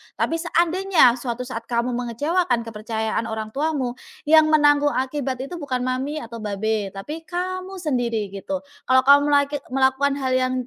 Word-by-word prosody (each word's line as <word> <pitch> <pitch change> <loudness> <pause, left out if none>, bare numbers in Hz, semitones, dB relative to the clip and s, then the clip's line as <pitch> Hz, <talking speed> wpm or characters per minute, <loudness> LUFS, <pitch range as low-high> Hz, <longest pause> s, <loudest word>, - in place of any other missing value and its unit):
Tapi 330 - -1
seandainya 340 -6 +3
suatu 240 0 -4
saat 230 -2 -7
kamu 240 +1 0
mengecewakan 245 +3 0
kepercayaan 220 0 -3
orang 220 -1 -5
tuamu, 280 -2 -1 0.3
yang 310 +1 +6
menanggung 290 -1 +4
akibat 265 -1 -2
itu 340 +6 -7
bukan 260 -5 -2
mami 260 +4 -2
atau 230 0 -8
babe, 210 0 -2
tapi 305 +12 -7
kamu 370 +1 -4
sendiri" 235 - -1
gitu. 275 +9 -5 0.2
"Kalau 260 0 +5
kamu 285 +1 +6
melek 285 -1 +3 0.2
melakukan 265 +2 +2
hal 265 -2 -2
yang, 255 0 +1
260 Hz, 150 wpm, -22 LUFS, 235-300 Hz, 0.3 s, yang